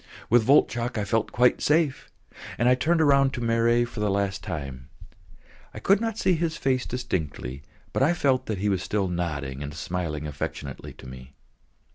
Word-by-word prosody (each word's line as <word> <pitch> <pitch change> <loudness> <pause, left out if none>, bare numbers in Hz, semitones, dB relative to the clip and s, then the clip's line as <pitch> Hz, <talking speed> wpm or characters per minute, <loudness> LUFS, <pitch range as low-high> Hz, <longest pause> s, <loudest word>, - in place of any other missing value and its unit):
With 120 0 +6
Voltchok 120 -1 +2
I 105 - -1
felt 110 +2 0
quite 125 0 +3
safe, 150 -2 +1 0.5
and 120 - +2
I 125 - +6
turned 160 +6 +2
round 140 -1 +4
to - - -4
Marey 115 +1 +2
for 120 -2 -8
the 105 -1 +1
last 100 -1 -1
time; 70 -4 -6 0.9
I - - -5
could 195 +2 +3
not 225 -2 -2
see 185 - +2
his 165 -1 -1
face 130 -2 0
distinctly, 80 - -4 0.3
but - - 0
I 150 +6 +4
felt 135 -5 +1
that 110 - -2
he 100 +3 -1
was 95 -3 +1
still 100 -1 -1
nodding 75 -6 -3
and 75 +1 -6
smiling 80 -3 -3
affectionately 70 -2 -6
to - - -14
me. 65 +1 -11
110 Hz, 180 wpm, -26 LUFS, -, 0.9 s, With